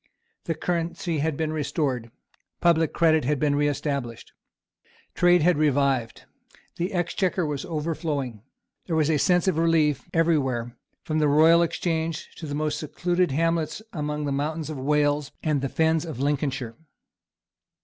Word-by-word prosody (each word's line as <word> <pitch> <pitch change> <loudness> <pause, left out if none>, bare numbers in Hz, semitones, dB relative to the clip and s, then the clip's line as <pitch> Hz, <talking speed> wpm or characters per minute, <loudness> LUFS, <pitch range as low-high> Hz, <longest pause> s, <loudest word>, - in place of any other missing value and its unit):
The 165 - -1
currency 170 0 -2
had 155 0 -1
been 155 -1 -1
restored. 140 -6 -2 0.5
Public 165 -2 +3
credit 160 -2 +3
had 145 +4 +1
been 145 0 +2
reestablished. 145 -4 -2 0.8
Trade 175 -2 +4
had 175 -2 +3
revived. 140 -5 +1 0.5
The 175 +4 -2
Exchequer 180 0 0
was 145 -2 -3
overflowing. 150 - -3 0.5
There 165 - -1
was 155 0 +2
a 150 - +2
sense 180 +4 +2
of 170 -4 +2
relief 155 -5 +2
every 165 -1 +3
where, 120 -3 -3 0.3
from 155 0 -1
the 150 - +3
Royal 160 +4 +6
Exchange 165 -1 -2
to 160 - -7
the 145 - -4
most 150 0 -1
secluded 175 +3 0
hamlets 165 +6 -1
among 150 -1 -3
the 140 - -2
mountains 155 +2 -2
of 145 - -6
Wales 145 +1 +1
and 150 -4 +1
the 135 - -2
fens 160 +1 +1
of 155 -7 -7
Lincolnshire. 135 -4 -1
155 Hz, 150 wpm, -25 LUFS, 145-165 Hz, 0.8 s, Royal